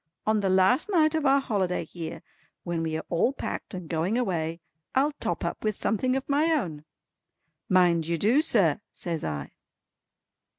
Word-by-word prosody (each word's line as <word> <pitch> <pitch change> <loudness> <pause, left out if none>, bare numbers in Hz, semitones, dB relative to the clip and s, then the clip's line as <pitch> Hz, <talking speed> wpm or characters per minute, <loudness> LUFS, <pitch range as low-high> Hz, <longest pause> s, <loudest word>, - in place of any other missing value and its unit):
On 215 0 +2
the 195 -2 0
last 190 - +3
night 320 -5 +3
of 315 -3 +1
our 275 +1 +5
holiday 190 -9 -1
here 165 0 -7 0.4
when 170 -2 -2
we 160 -1 -1
are - - -6
all 175 +10 +2
packed 240 - -5
and 180 -3 -7
going 170 +7 0
away, 165 -8 -1 0.4
I'll 280 +3 +3
top - - -2
up - - -4
with 215 -1 -1
something 255 +4 0
of 270 - -3
my 290 +2 +2
own." 165 - -1 0.8
"Mind 175 -3 +4
you 170 0 0
do 230 - +3
sir" 205 - +2
says 170 -3 -4
I. 75 -2 -4
190 Hz, 170 wpm, -27 LUFS, 165-260 Hz, 0.8 s, our